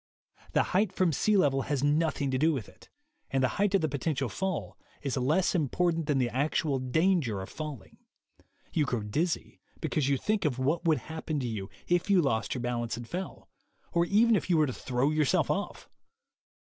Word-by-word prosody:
The - - +4
height 195 +1 +3
from 185 -3 +1
sea 210 +9 +2
level 135 -7 +3
has 140 0 -2
nothing 145 -2 +1
to 130 - 0
do 160 +3 +4
with 130 -9 -3
it; - - -18 0.4
and 135 -1 +1
the - - +5
height 200 -1 +3
of 195 - +3
the 155 - +1
potential 140 -2 -1
fall 185 - -3 0.3
is 135 -3 -1
less 150 +8 +2
important 165 0 0
than 145 -3 +2
the 125 -2 +1
actual 140 +1 0
danger 130 - +1
of 95 - -7
falling. 150 -10 -7 0.8
You 150 - +2
grow 120 -5 -2
dizzy 155 +12 -2 0.2
because 150 -3 0
you 140 - +3
think 210 +8 0
of 145 -6 0
what 145 +7 0
would 160 -2 +4
happen 160 -1 -4
to 125 - -2
you 105 -4 -4 0.2
if 175 +2 +1
you 195 -2 +5
lost 125 -8 0
your 125 - -3
balance 120 -2 -2
and 120 -1 -7
fell, 185 +6 -6 0.5
or 170 0 +3
even 220 +5 +4
if 195 - -1
you 170 - +4
were 155 - +4
to 130 - -3
throw 130 +4 0
yourself 155 -3 +2
off. - - -3
150 Hz, 200 wpm, -29 LUFS, 130-170 Hz, 0.8 s, the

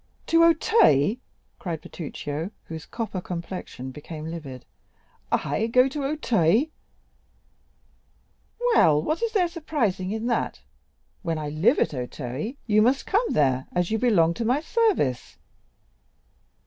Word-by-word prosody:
"To 330 0 +4
Auteuil!" 255 - +4 0.4
cried 165 -4 -4
Bertuccio, 155 +1 -5
whose 160 -1 -8
copper 220 -5 -4
complexion 170 -7 -6
became 155 +3 -8
livid—"I 155 - -5
go 250 +3 +4
to 285 +1 -4
Auteuil?" 245 - +2 2.1
"Well, 155 - +5
what 310 - -1
is 465 -1 -1
there 370 -5 +3
surprising 290 - -2
in 220 +2 -3
that? 240 -1 -1 0.6
When 165 -4 -2
I 150 -1 -4
live 170 - +3
at - - +1
Auteuil, 130 - -4
you 215 -1 +4
must 255 +5 +2
come 440 +5 +1
there, 130 -3 +1
as 175 +1 0
you 220 - +1
belong 175 -9 +3
to 230 - -3
my 250 +5 +2
service." 345 - 0
195 Hz, 120 wpm, -25 LUFS, -, 2.1 s, Well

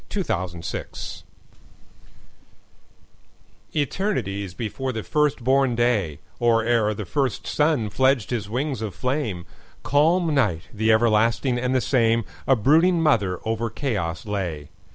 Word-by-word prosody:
Mother 90 - -2
Night 85 - -6 2.5
ETERNITIES 120 - -2
before 125 +5 -3
the 110 -3 -4
first 150 -4 0
born 135 -1 +3
day, 110 - +1 0.2
Or 115 -1 +3
ere 115 -3 +2
the 105 - -5
first 130 +4 -1
sun 150 -9 +1
fledged 130 -4 +2
his 105 -5 -2
wings 130 +1 -2
of 105 -4 -4
flame, 125 - -2 0.4
Calm 160 +3 +2
Night, 105 - +1
the 110 +1 +2
everlasting 115 +3 +2
and 125 +1 0
the 130 - +3
same,A 115 +1 +1
brooding 160 - +4
mother 105 - +2
over 115 +1 -1
chaos 100 - -3
lay. 90 -8 -4
115 Hz, 120 wpm, -23 LUFS, 105-135 Hz, 2.5 s, brooding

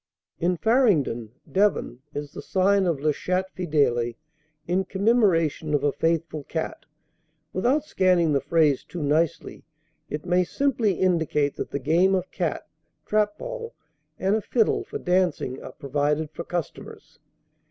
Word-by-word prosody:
"In 175 +1 +1
Farringdon 165 - +2 0.2
(Devon) 195 -11 +1 0.2
is 145 -1 -5
the - - -8
sign 195 0 +2
of 165 -5 0
'La 155 +2 +2
Chatte 185 +5 -2
Fidèle,' 140 -9 +1 0.5
in 180 +2 +1
commemoration 185 -7 +2
of 145 - 0
a 145 - +3
faithful 160 0 -1
cat. 160 - -4 0.7
Without 255 +10 +2
scanning 180 - +2
the 140 - +2
phrase 145 -1 +2
too 170 -4 -6
nicely, 160 +3 0 0.5
it 150 +2 -5
may 180 0 +3
simply 235 0 +1
indicate 160 -5 +1
that - - -4
the - - -2
game 170 +8 +3
of 185 -1 -3
cat - - -2 0.4
(trap 210 -1 +1
ball) - - -6 0.4
and 195 +2 +1
a 220 - 0
fiddle 225 +1 +1
for - - -6
dancing 180 -8 0
are - - -9
provided 145 +2 -1
for 170 - -6
customers." 175 -3 -6
170 Hz, 140 wpm, -25 LUFS, 150-190 Hz, 0.7 s, a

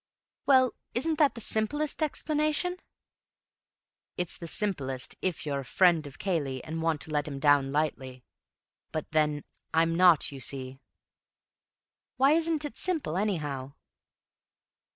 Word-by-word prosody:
"Well, 260 -3 +5 0.2
isn't 310 +5 0
that 290 -5 +4
the 230 - -7
simplest 290 +10 0
explanation?" 305 +3 -1 1.4
"It's 180 -1 -1
the 170 - -8
simplest 135 -11 +1
if 185 -4 -2
you're 140 -2 -2
a - - -5
friend 170 +2 +3
of 140 +2 -12
Cayley 145 -9 -2
and 160 +1 -5
want 160 -2 0
to 160 - -4
let 150 -1 0
him 140 -2 -5
down 140 -1 +3
lightly. 135 -4 -2 0.7
But 155 - -5
then 150 -2 +1 0.3
I'm 165 +1 +3
not, 175 -4 +5
you 140 - -8
see." 130 +1 -4 1.4
"Why 270 +2 +5
isn't 320 -1 +2
it 295 - -7
simple, 320 - -1
anyhow?" 150 -9 -2
165 Hz, 130 wpm, -28 LUFS, -, 1.4 s, Well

